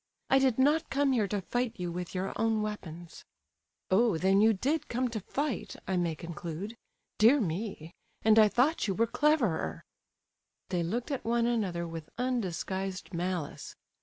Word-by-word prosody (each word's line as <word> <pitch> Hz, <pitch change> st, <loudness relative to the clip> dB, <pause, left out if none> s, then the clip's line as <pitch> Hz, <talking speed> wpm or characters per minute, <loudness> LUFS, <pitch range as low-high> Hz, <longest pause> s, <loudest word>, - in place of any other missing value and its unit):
"I 270 Hz, -, +6 dB
did 265 Hz, -4 st, +2 dB
not 300 Hz, +5 st, +3 dB
come 280 Hz, 0 st, +2 dB
here 225 Hz, -6 st, +2 dB
to 200 Hz, 0 st, -2 dB
fight 245 Hz, +1 st, -1 dB
you 175 Hz, -1 st, -2 dB
with 180 Hz, +1 st, -5 dB
your 185 Hz, +1 st, -2 dB
own 220 Hz, -1 st, +1 dB
weapons. 175 Hz, -5 st, -7 dB, 0.7 s
"Oh! 210 Hz, -1 st, +4 dB
then 195 Hz, +4 st, +3 dB
you 220 Hz, +1 st, +6 dB
did 275 Hz, +10 st, -1 dB
come 250 Hz, +1 st, -1 dB
'to 225 Hz, -2 st, -3 dB
fight,' 285 Hz, +6 st, -3 dB
I 190 Hz, -, 0 dB
may 170 Hz, -3 st, 0 dB
conclude? 170 Hz, +5 st, -6 dB, 0.4 s
Dear 235 Hz, +7 st, +6 dB
me!—and 210 Hz, -, -1 dB
I 215 Hz, -, +8 dB
thought 250 Hz, +6 st, +2 dB
you 195 Hz, -, 0 dB
were 230 Hz, -, +3 dB
cleverer—" 230 Hz, -, +1 dB, 0.9 s
They 180 Hz, -, 0 dB
looked 235 Hz, -, -2 dB
at 275 Hz, -, -2 dB
one 235 Hz, 0 st, +1 dB
another 195 Hz, -8 st, 0 dB
with 165 Hz, -2 st, -7 dB
undisguised 190 Hz, -6 st, -2 dB
malice. 175 Hz, -2 st, -3 dB
210 Hz, 160 wpm, -30 LUFS, 175-245 Hz, 0.9 s, I